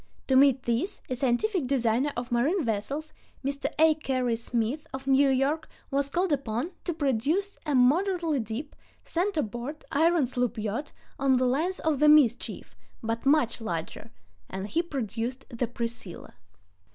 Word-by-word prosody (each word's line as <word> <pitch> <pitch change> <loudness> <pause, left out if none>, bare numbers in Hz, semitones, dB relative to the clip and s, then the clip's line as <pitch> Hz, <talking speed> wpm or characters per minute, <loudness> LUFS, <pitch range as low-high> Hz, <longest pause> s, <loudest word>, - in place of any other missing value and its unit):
To 265 - +4
meet 270 -1 +5
this, 240 - -1
a 255 - -1
scientific 270 - +1
designer 255 +1 +1
of 240 +1 -4
marine 285 +8 +2
vessels, 255 +9 -3 0.3
Mr. 280 0 -1
A. 320 0 +6
Cary 255 -6 -1
Smith 235 +4 -2
of 265 0 -7
New 275 +1 +4
York, 275 +4 +1 0.2
was 280 0 0
called 355 +2 +1
upon 265 +3 -2
to 345 - -1
produce 300 - 0
a 295 - +1
moderately 325 +4 +3
deep, 230 +6 -5 0.3
center 350 -2 0
board, 240 +8 -6
iron 325 0 +3
sloop 245 -2 -1
yacht 220 +7 -3 0.3
on 270 -1 +3
the 255 0 +3
lines 315 +9 0
of 310 -4 +1
the 300 - +6
Mischief, 285 -6 +3 0.3
but 225 +3 -2
much 275 -6 +3
larger, 170 +1 -5 0.4
and 190 +2 -5
he 330 - +1
produced 250 - -4
the 240 -1 -2
Priscilla. 230 -6 -6
270 Hz, 150 wpm, -27 LUFS, 235-305 Hz, 0.4 s, A